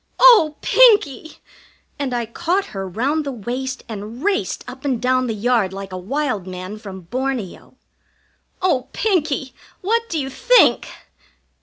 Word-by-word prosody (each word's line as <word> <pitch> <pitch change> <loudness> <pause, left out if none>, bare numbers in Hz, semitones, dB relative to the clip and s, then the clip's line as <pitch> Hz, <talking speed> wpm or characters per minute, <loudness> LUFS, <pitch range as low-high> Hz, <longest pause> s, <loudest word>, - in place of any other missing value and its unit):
"Oh, 445 -12 +7
Pinkie!" 410 - +4 0.6
And 275 -3 -2
I 240 -1 -1
caught 345 - -1
her 195 -1 -4
round 275 - -1
the 280 - -4
waist 255 +3 -5
and 220 +4 -7
raced 405 -1 -1
up 260 +2 -10
and 265 -5 0
down 255 +1 +1
the 225 - -2
yard 215 -3 +1
like 195 -1 -7
a - - -4
wild 225 -2 -2
man 185 +3 -7
from 195 -4 -9
Borneo. 245 +2 -4 0.9
"Oh, 265 -9 +1
Pinkie, 305 - 0 0.3
what 460 +4 0
do 330 - -2
you 270 -2 -3
think?" - - +4
255 Hz, 145 wpm, -20 LUFS, 215-310 Hz, 0.9 s, Oh